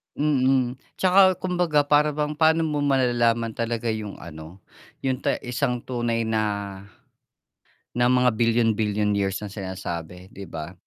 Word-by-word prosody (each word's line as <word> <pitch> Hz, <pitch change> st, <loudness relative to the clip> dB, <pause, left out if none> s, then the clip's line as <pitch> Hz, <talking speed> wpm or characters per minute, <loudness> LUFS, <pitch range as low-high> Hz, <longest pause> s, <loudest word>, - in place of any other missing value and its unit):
mm, 130 Hz, -3 st, +1 dB, 0.2 s
'tsaka 190 Hz, 0 st, +5 dB
kumbaga 175 Hz, -5 st, +1 dB
para 150 Hz, +1 st, +3 dB
bang 150 Hz, 0 st, -2 dB
pa'no 160 Hz, +1 st, +4 dB
mo 150 Hz, -2 st, -1 dB
malalaman 120 Hz, -4 st, +2 dB
talaga 115 Hz, 0 st, -2 dB
yung 110 Hz, -2 st, -4 dB
ano, 80 Hz, +3 st, -11 dB, 0.4 s
yung 130 Hz, -1 st, 0 dB
ta -, -, 0 dB
isang 125 Hz, 0 st, -2 dB
tunay 120 Hz, -2 st, -2 dB
na 100 Hz, -3 st, -2 dB, 1.1 s
na 120 Hz, 0 st, +2 dB
mga 125 Hz, -1 st, +3 dB
bilyon-bilyon 110 Hz, -2 st, +1 dB
years 100 Hz, -1 st, 0 dB
na 100 Hz, -, -7 dB
sinasabi 90 Hz, -2 st, -6 dB
'di 100 Hz, 0 st, -9 dB
ba? 80 Hz, +2 st, -7 dB
120 Hz, 135 wpm, -24 LUFS, 100-140 Hz, 1.1 s, tsaka